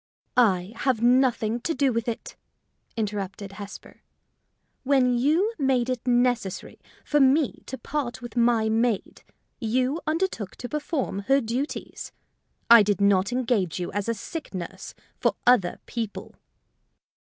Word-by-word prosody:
"I 195 -5 +3
have 250 -3 0
nothing 240 -2 +3
to 325 +6 -2
do 275 -3 +2
with 230 0 -2
it," 230 - -5 0.6
interrupted 200 -2 -4
Hesper. 200 0 -10 0.8
"When 260 -2 +3
you 315 - +2
made 260 -3 +1
it 255 0 -4
necessary 245 -5 0 0.3
for 295 - +2
me 275 +2 +3
to 265 - -5
part 275 -5 -4
with 240 -2 -9
my 235 -2 +3
maid, 225 -1 0 0.4
you 255 +7 0
undertook 310 - -2
to 245 - -7
perform 295 - -2
her 275 +1 +5
duties. 250 +4 -4 0.6
I 235 -1 +9
did 205 -2 +1
not 200 +1 +3
engage 230 -9 0
you 175 - -4
as 205 +2 -2
a 230 - 0
sick 295 - -7
nurse 185 +1 -7 0.2
for - - +1
other 235 -8 +4
people." 225 -3 -5
240 Hz, 135 wpm, -25 LUFS, 210-265 Hz, 0.8 s, I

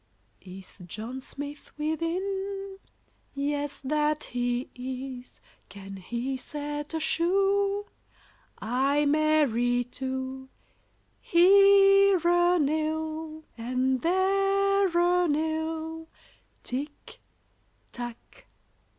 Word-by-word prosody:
] - - -41
Is 190 +1 -12
John 230 +8 -6
Smith 285 +2 -8
within? 385 +5 -3 0.6
Yes, 285 0 -2
that 300 +2 0
he 245 +1 -2
is. 255 0 -7 0.3
Can 195 -1 -9
he 240 +7 -4
set 295 +3 -5
a - - 0
shoe? 395 +5 +1 0.7
Ay, 270 +6 +1
marry, 285 -5 +2
two; 265 +1 -5 0.7
Here 395 +2 +6
a 350 +1 +4
nail 315 +1 -2
and 255 +2 -1
there 390 +3 +2
a 355 0 +3
nail, 320 +1 -2 0.6
Tick, 285 +4 -6 0.7
tack, 240 -1 -6
too. - - -20
300 Hz, 85 wpm, -27 LUFS, 260-350 Hz, 0.7 s, Here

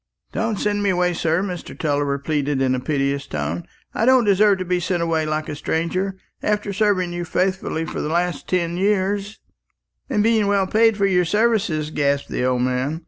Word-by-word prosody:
"Don't 225 -2 -1
send 205 0 0
me 200 - +1
away, 180 -1 +1
sir," 165 +1 0
Mr. 180 -4 -6
Tulliver 145 -4 0
pleaded 145 -1 -1
in 130 -1 +2
a 130 - 0
piteous 140 +1 -1
tone. 75 +3 -3 0.3
"I - - -1
don't 255 -1 +5
deserve 205 0 +4
to 185 - -4
be 180 0 0
sent 175 0 -1
away 160 -2 0
like 155 0 -2
a 150 - -4
stranger, 185 +6 -2 0.2
after 210 -1 -1
serving 190 -4 +1
you 175 0 -3
faithfully 185 -2 -1
for - - -4
the 150 - -3
last 175 -1 -1
ten 175 -2 0
years 200 +1 0 0.4
" - - -49
"And 210 -6 +1
being 220 -2 +3
well 200 -1 +2
paid 220 +2 +3
for 200 - +2
your 180 -2 +3
services," 195 -7 +1
gasped 140 -2 0
the - - -2
old 125 -1 +1
man. 130 +5 -1
180 Hz, 195 wpm, -21 LUFS, 150-200 Hz, 0.4 s, don't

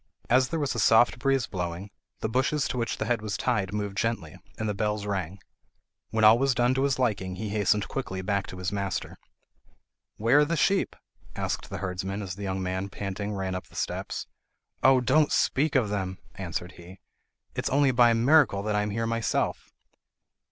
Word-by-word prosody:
As 130 +1 +4
there 165 - -2
was 145 -2 0
a 120 - -3
soft 115 +3 +5
breeze 135 -2 +2
blowing, 90 +1 -5 0.3
the - - 0
bushes 135 +5 +1
to - - -3
which 115 -1 -2
the - - -2
head 120 0 0
was 105 -2 -3
tied 105 -7 0
moved 105 -1 -3
gently, 105 -8 -2 0.2
and 110 - -2
the 105 - 0
bells 105 0 -1
rang. 95 -3 -3 0.7
When 110 0 0
all 110 +2 +8
was 135 -1 +2
done 120 +1 +3
to 135 +1 +1
his 140 -2 +1
liking 105 -7 -1
he 105 +3 -4
hastened 105 0 +1
quickly 95 -8 -4
back 100 0 -1
to 90 - -8
his 90 0 -3
master. 100 -3 -3 1.0
"Where 115 +7 +4
are 150 - +5
the 165 +2 -1
sheep?" 195 +6 +2 0.4
asked - - -3
the - - -5
herdsman 95 +2 -3
as 95 -2 -5
the 100 - -10
young 95 -1 -2
man 95 +1 -2
ran - - -9
panting 100 +1 -4
up 90 - -5
the - - -19
steps. - - -3 0.6
"Oh! 130 -1 +5
don't 150 +4 +3
speak 145 +2 +1
of 120 -6 +3
them," 95 -2 -3 0.2
answered 90 -1 -5
he. 90 +2 -12 0.5
"It - - -4
is - - +1
only 140 0 +3
by 120 -1 +5
a 115 - +3
miracle 120 -4 +4
that 105 0 -1
I 105 - +2
am 105 - -2
here 115 +3 -2
myself." 115 -2 -1
105 Hz, 200 wpm, -27 LUFS, 95-125 Hz, 1.0 s, all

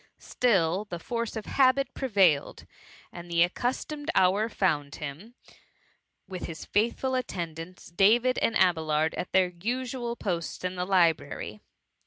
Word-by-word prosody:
Still 195 -5 +1
the 180 -4 -6
force 230 +6 -4
of 220 - -5
habit 270 0 +2
prevailed, 195 - +1 0.5
and 175 0 -10
the 170 0 +4
accustomed 265 - -3
hour 200 +5 +3
found 150 -9 0
him 155 - -8 0.9
with 185 -1 -6
his 160 -1 -8
faithful 235 +5 0
attendants, 170 -8 -5
Davis 230 +8 +4
and 230 - +2
Abelard, 160 -4 +2
at - - -5
their 185 -1 +3
usual 240 +6 -3
posts 175 -7 -4
in 185 0 -2
the 180 -1 -3
library. 165 - +1
190 Hz, 130 wpm, -27 LUFS, 170-235 Hz, 0.9 s, the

